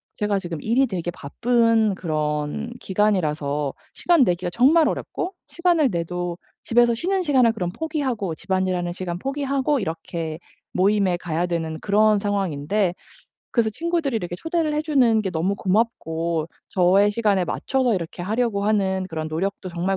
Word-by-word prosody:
제가 210 -2 0
지금 170 -5 -6
일이 250 +4 +2
되게 175 -4 -3
바쁜 225 +5 +1
그런 155 +6 -2
기간이라서 155 -8 0 0.2
시간 340 -5 +3
내기가 180 -4 0
정말 300 - +5
어렵고 365 +2 -3
시간을 340 -5 +2
내도 175 0 -3 0.3
집에서 240 0 +3
쉬는 370 +7 0
시간을 260 -7 +4
그럼 185 -6 -3
포기하고, 265 - -2
집안일하는 185 -1 -1
시간 175 -2 -4
포기하고 275 +2 0
이렇게 165 -3 -4 0.3
모임에 195 -1 +2
가야 170 0 -2
되는 165 -2 -2
그런 210 +1 +3
상황인데 195 -2 0 0.6
그래서 230 -3 +2
친구들이 325 -2 -1
이렇게 175 -4 -4
초대를 325 - -1
해 300 - 0
주는 250 -8 +3
게 190 - -2
너무 175 +4 0
고맙고 170 -6 -1 0.2
저의 190 +3 +4
시간에 205 -4 +2
맞춰서 255 +6 0
이렇게 175 -1 -5
하려고 215 +1 0
하는 190 -3 +1
그런 160 -2 -4
노력도 190 +4 -3
정말 180 +2 -1
200 Hz, 355 characters per minute, -23 LUFS, 175-240 Hz, 0.6 s, 정말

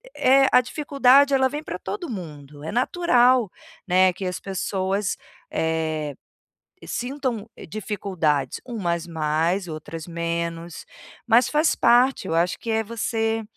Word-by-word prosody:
é 270 +1 +5
a - - +7
dificuldade 280 0 +3
ela 265 -1 +4
vem 295 +2 -5
pra - - -6
todo 360 -8 -5
mundo, 150 - -8
é 160 - -4
natural, 250 - +3 0.4
né, 185 0 +4
que 190 - -6
as 180 -1 -3
pessoas, 195 +1 -2 0.3
eh, 160 -2 -1 0.7
sintam, 245 -4 -3
eh, - - -10
dificuldades 175 - -2
umas 175 -9 -2
mais 165 +3 0
outras 160 0 -7
menos. 170 0 -4 0.4
Mas 235 +2 +5
faz 305 +2 +2
parte, 245 -3 +3
eu 165 - 0
acho 170 +1 +1
que 230 - -5
é 220 0 +1
você, 225 0 -1
200 Hz, 135 wpm, -23 LUFS, 165-245 Hz, 0.7 s, a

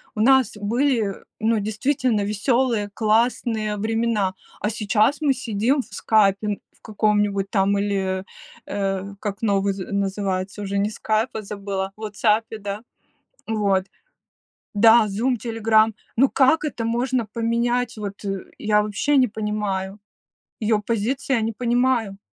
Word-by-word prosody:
у - - -5
нас 260 -2 +4
были, 225 -1 0 0.2
ну, 225 0 +2
действительно 220 +2 0
веселые, 215 +1 +1
классные 220 -1 +1
времена, 220 -2 0 0.3
а 210 - -1
сейчас 220 +6 +1
мы 290 -3 +3
сидим 250 +2 0
в - - -16
"Скайпе" 210 -1 +2 0.2
в - - -36
каком-нибудь 205 -2 0
там 200 0 +2
или, 195 -2 -1
э, - - -13 0.4
э, 195 0 -3
как 200 -1 -4
новый 200 -2 +1 0.2
называется, 195 0 -2
уже 200 0 -2
не 200 +1 +1
"Скайп", 220 +2 -1
а 220 - -2
забыла, 195 -1 -4
в - - -14
"Вотсапе", 215 +1 0
да. 205 +1 -5 0.7
Вот 200 -4 +1 0.9
да, 225 +1 +6
"Зум", 235 +5 0
"Телеграм", 225 -1 +2 0.2
ну 265 +3 +5
как 295 +4 +3
это 265 -6 -3
можно 240 +1 0
поменять? 235 +2 -1
Вот, 200 -1 -6 0.4
я 210 -1 +2
вообще 215 +8 +1
не 255 -1 +5
понимаю, 210 -2 -3 0.6
её 215 -1 +2
позиции 235 +5 -1
я 235 - +2
не 225 +1 -1
понимаю! 240 -3 0
215 Hz, 135 wpm, -23 LUFS, 200-235 Hz, 0.9 s, да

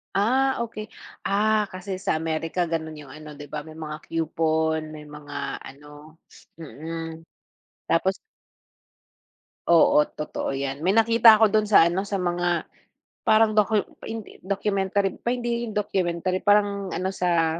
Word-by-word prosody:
Ah, 255 +6 +2
okey. 220 -2 -5 0.4
Ah, 210 +1 +2
kasi 185 +1 -5
sa 190 - -1
Amerika 160 +2 -1
gano'n 160 -1 -3
yung 140 - -13
ano, 155 -1 -10
'di 145 0 -11
ba, 150 -1 -5
may 155 - -11
mga 155 -1 -6
coupon, 160 -1 -1
may 150 -1 -10
mga 145 -1 -6
ano 145 +3 -14 0.4
mm, 165 +3 -7 0.7
tapos 190 +3 +2 1.5
Oo, 165 -3 +6
totoo 150 - -4
yan, 135 +2 -4
may 185 - +3
nakita 225 0 +6
ako 220 - +7
do'n 215 +1 +2
sa 205 -5 +6
ano, 180 +3 -1
sa 200 -1 -3
mga 175 -1 0 0.6
parang 220 0 +5
docu 210 0 +2 0.2
hindi, 225 -2 -7
documentary, 195 0 0
pa 240 - -1
hindi 240 -1 -2
'yon 215 - -7
documentary, 185 -3 -1
parang 205 -1 +2
ano 185 +1 -1
sa, 170 -3 +1
175 Hz, 140 wpm, -25 LUFS, 160-205 Hz, 1.5 s, ako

